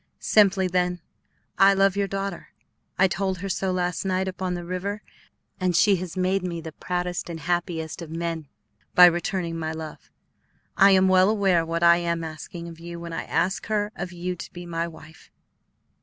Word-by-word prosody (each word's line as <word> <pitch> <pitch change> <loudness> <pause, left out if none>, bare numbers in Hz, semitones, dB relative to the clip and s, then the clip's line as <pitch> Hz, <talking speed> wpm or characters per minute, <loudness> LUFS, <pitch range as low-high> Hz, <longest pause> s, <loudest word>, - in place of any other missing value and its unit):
Simply, 195 -3 +3
then, 180 0 0 0.6
I 195 0 +7
love 195 0 +3
your 200 0 0
daughter. 195 -1 -4 0.5
I 190 - +5
told 190 0 -2
her 195 +2 -5
so 190 0 -1
last 180 -1 -1
night 190 0 0
upon 185 -1 -3
the 175 -1 -6
river, 195 +4 -4 0.6
and 185 -2 +1
she 195 +3 +5
has 180 0 -6
made 185 +1 +1
me 175 -2 -4
the 160 -1 -7
proudest 175 +2 -3
and 165 -1 -5
happiest 170 -1 -2
of 165 - -7
men 165 -1 -4 0.5
by 180 - +10
returning 175 -1 0
my 160 -1 -2
love. 160 -1 -8 0.7
I 195 - +7
am 190 -1 +5
well 185 +1 +5
aware 195 -6 +3
what 165 +1 -2
I 170 0 +7
am 170 -1 -1
asking 160 +2 -7
of 165 -1 -10
you 170 0 -8
when 170 0 -7
I - - -4
ask 190 +2 -1
her 210 -1 0
of 180 - -5
you 180 +1 -4
to - - -8
be 175 0 -9
my 170 0 -2
wife. 160 -1 -14
180 Hz, 185 wpm, -25 LUFS, 170-190 Hz, 0.7 s, by